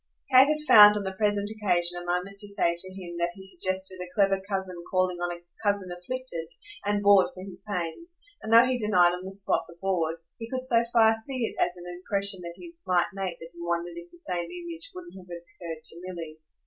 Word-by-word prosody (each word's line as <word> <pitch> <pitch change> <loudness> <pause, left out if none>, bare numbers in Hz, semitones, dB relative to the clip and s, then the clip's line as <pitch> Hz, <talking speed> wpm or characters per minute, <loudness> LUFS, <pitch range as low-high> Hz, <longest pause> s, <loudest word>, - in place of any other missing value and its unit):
Kate 260 +1 +8
had 305 0 0
found 210 -1 +9
on 205 - -3
the 190 -1 -4
present 205 0 0
occasion 175 -5 +1
a - - -9
moment 180 +3 -3
to 205 - -2
say 200 -4 +1
to 185 +2 -3
him 175 -3 -8
that 170 0 0
he 190 - -11
suggested 190 0 +1
a 180 - -7
clever 195 -2 +3
cousin 190 -2 -3
calling 185 -1 +1
on 175 0 -2
a 175 0 -8 0.2
cousin 200 -4 0
afflicted, 175 -3 -6 0.3
and 205 0 0
bored 200 -2 +6
for 185 - -8
his 190 -2 -10
pains; 205 - -4 0.2
and 220 - -5
though 230 +2 +8
he 255 -1 0
denied 180 -5 +4
on 180 +1 -5
the 190 - -7
spot 195 0 -1
the 170 - -14
"bored" 170 -4 0 0.2
he 225 0 -7
could 255 0 -3
so 235 -2 +4
far 225 -2 +5
see 240 +2 -3
it - - -6
as 175 +1 +1
an 175 - -10
impression 190 +2 0 0.2
he 340 - -12
might 180 0 +2
make 190 -3 -4
that 165 - -11
he 170 - -12
wondered 170 0 -2
if 170 0 -10
the 175 - -18
same 175 0 -4
image 345 0 -8
wouldn't 355 -1 -10
have 185 -1 -12
occurred 170 -2 -9
to 170 - -6
Milly. 165 -4 -7
190 Hz, 225 wpm, -27 LUFS, 175-210 Hz, 0.3 s, found